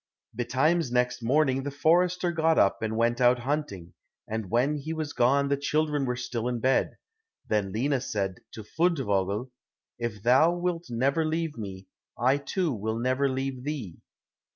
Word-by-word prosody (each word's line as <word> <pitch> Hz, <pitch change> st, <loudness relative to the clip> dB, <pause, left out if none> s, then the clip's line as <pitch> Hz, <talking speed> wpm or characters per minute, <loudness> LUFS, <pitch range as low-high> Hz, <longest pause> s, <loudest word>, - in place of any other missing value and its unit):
Betimes 135 Hz, +5 st, +1 dB
next 125 Hz, 0 st, +1 dB
morning 135 Hz, +2 st, +2 dB
the 140 Hz, -, -4 dB
forester 175 Hz, +5 st, +2 dB
got 160 Hz, -1 st, +2 dB
up 100 Hz, -, +3 dB
and 110 Hz, 0 st, -2 dB
went 120 Hz, +2 st, +1 dB
out 125 Hz, 0 st, +5 dB
hunting, 120 Hz, -, -3 dB, 0.3 s
and 110 Hz, -3 st, -4 dB
when 130 Hz, +8 st, +1 dB
he 155 Hz, +3 st, -5 dB
was 155 Hz, -2 st, -4 dB
gone 140 Hz, +3 st, +3 dB
the 140 Hz, -, +2 dB
children 150 Hz, 0 st, 0 dB
were 125 Hz, -1 st, -1 dB
still 120 Hz, -1 st, -3 dB
in 125 Hz, -1 st, -2 dB
bed. 130 Hz, +3 st, +1 dB, 0.5 s
Then 105 Hz, -3 st, 0 dB
Lina 130 Hz, +5 st, 0 dB
said 95 Hz, -6 st, -3 dB
to 110 Hz, -, -8 dB
Fundevogel, 120 Hz, -, 0 dB, 0.5 s
"If 110 Hz, -4 st, -4 dB
thou 135 Hz, +8 st, +5 dB
wilt 175 Hz, -1 st, -2 dB
never 135 Hz, +7 st, +1 dB
leave 160 Hz, 0 st, -2 dB
me, 95 Hz, -4 st, -7 dB, 0.3 s
I 130 Hz, +3 st, +3 dB
too 160 Hz, +2 st, -1 dB
will 110 Hz, +1 st, -3 dB
never 130 Hz, +3 st, +1 dB
leave 130 Hz, -1 st, -3 dB
thee." 135 Hz, -, -5 dB
130 Hz, 160 wpm, -27 LUFS, 115-150 Hz, 0.5 s, out